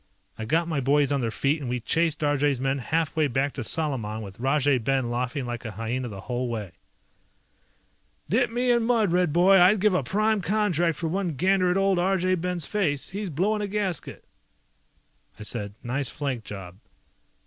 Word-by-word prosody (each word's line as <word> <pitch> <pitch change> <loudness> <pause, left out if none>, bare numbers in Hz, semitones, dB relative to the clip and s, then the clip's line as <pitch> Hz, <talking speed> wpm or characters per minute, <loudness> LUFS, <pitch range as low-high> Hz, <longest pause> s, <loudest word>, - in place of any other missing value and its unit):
I 110 - -6
got 165 +8 +1
my 155 -4 -1
boys 140 +1 +2
on 140 -2 +1
their 115 - 0
feet 140 +7 0
and 130 - -4
we 125 0 -1
chased 160 +5 0
Arjay's 145 -2 +1
men 135 +1 0
half 160 +4 -1
way 155 -2 +2
back 135 +2 -1
to 130 - -5
Salaman 115 -7 -1
with 100 0 -10
Rajay 135 +1 +2
Ben 130 0 0
laughing 125 +3 -2
like 120 -1 -5
a 115 - -5
hyena 115 +4 -3
the 100 -4 -8
whole 125 +3 -3
way. 110 -6 -4 1.6
"Dip 240 +3 +2
me 245 +2 +1
in 240 -1 +3
mud, 225 -5 +2
Red 180 -2 +2
boy, 185 +4 +5
I'd 190 +4 +6
give 210 0 +3
a 180 - +2
prime 215 +1 +1
contract 175 -6 +1
for 165 - -2
one 180 0 -1
gander 185 +4 +2
at 180 - +1
old 195 -2 +2
Arjay 185 0 +1
Ben's 180 -3 -2
face. 160 -10 -1
He's 200 0 -4
blowing 200 +8 0
a 205 - -2
gasket!" 200 -4 -2 1.2
I - - -7
said, 105 -2 -4
"Nice 130 +2 -2
flank 130 -6 -4
job." 95 -3 -8
150 Hz, 190 wpm, -26 LUFS, 125-185 Hz, 1.6 s, I'd